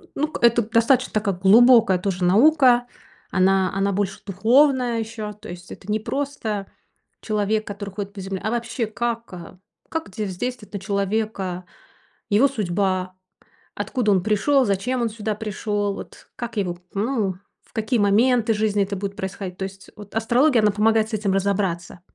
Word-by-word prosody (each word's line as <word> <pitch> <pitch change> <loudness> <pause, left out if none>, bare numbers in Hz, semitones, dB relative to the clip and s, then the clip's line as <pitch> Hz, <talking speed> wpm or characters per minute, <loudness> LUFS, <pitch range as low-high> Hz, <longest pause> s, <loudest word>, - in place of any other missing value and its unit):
ну 300 - 0
к - - -7
это 235 0 +5
достаточно 230 +3 +2
такая 205 -3 0
глубокая 215 0 +6
тоже 185 -1 -2
наука. 245 - +5 0.4
Она 190 0 +3
она 195 +1 +1
больше 195 0 -2
духовная 245 +5 +3
ещё. 220 -1 -5
То 210 - -13
есть 175 0 -10
это 205 - -7
не 215 - +1
просто 225 -6 -3 0.6
человек, 215 0 0
который 200 0 -6
ходит 200 -1 -5
по 200 - -9
земле, 190 0 -4
а 215 - 0
вообще 235 0 -2
как, 230 0 -3
э 175 0 -10 0.3
как 320 -10 -4
де 210 +3 -4
воздействовует 210 +3 -5
на 200 - -3
человека 200 -2 -2 0.7
его 225 +7 +5
судьба, 185 -5 -1 0.6
откуда 240 -6 0
он 190 -2 +3
пришёл, 255 +6 +2
зачем 230 +5 -1
он 235 - +1
сюда 215 -1 -3
пришёл, 205 -1 -2
вот - - -11
как 235 -2 -6
его, 180 -3 -1 0.2
ну, 205 -3 -1 0.3
в - - -29
какие 225 +1 0
моменты 225 +3 +3
жизни 210 -1 +1
это 200 +1 -4
будет 195 +1 -4
происходить. 190 -1 -6
То - - -4
есть 195 0 -8
вот 205 0 -12
астрология, 240 +3 +3
она 210 -1 +4
помогает 220 +1 +2
с - - -12
этим 205 -2 0
разобраться. 190 -3 -1
210 Hz, 165 wpm, -22 LUFS, 195-230 Hz, 0.7 s, глубокая